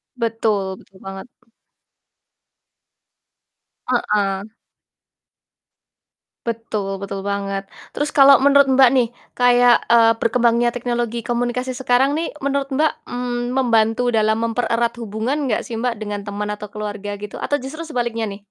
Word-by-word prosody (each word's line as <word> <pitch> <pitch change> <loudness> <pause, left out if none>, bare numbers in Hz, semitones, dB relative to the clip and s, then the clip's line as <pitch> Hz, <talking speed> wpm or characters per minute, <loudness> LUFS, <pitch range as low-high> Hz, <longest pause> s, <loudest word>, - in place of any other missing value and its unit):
Betul 225 -4 0 0.2
betul 190 - -20
banget. 195 +5 -8 2.6
Heeh. 205 -4 0 2.0
Betul 215 -4 -3
betul 195 0 -5
banget. 195 0 -3 0.2
Terus 295 +1 -3
kalau 275 -1 +8
menurut, 280 0 +5
Mbak, 260 -1 +6
nih 245 -3 +3 0.3
kayak, 245 -1 +5
eee, 230 -1 +6
berkembangnya 235 0 +2
teknologi 240 -1 -2
komunikasi 245 +2 -2
sekarang 265 +3 +2
nih 330 +1 -2
menurut, 280 0 -2
Mbak, 305 +4 +2 0.2
mmm, 245 0 -3
membantu 235 -2 +2
dalam 220 -1 +2
mempererat 230 +1 0
hubungan 235 +7 -2
nggak - - -1
sih, 230 - -5
Mbak, 230 -1 -2
dengan 205 -1 -5
teman 205 0 -4
atau 210 0 -6
keluarga, 205 -1 -5
gitu? 210 -1 -8
Atau 290 - -1
justru 295 +6 -7
sebaliknya 240 -7 -2
nih? 200 +1 -9
235 Hz, 125 wpm, -20 LUFS, 210-250 Hz, 2.6 s, kalau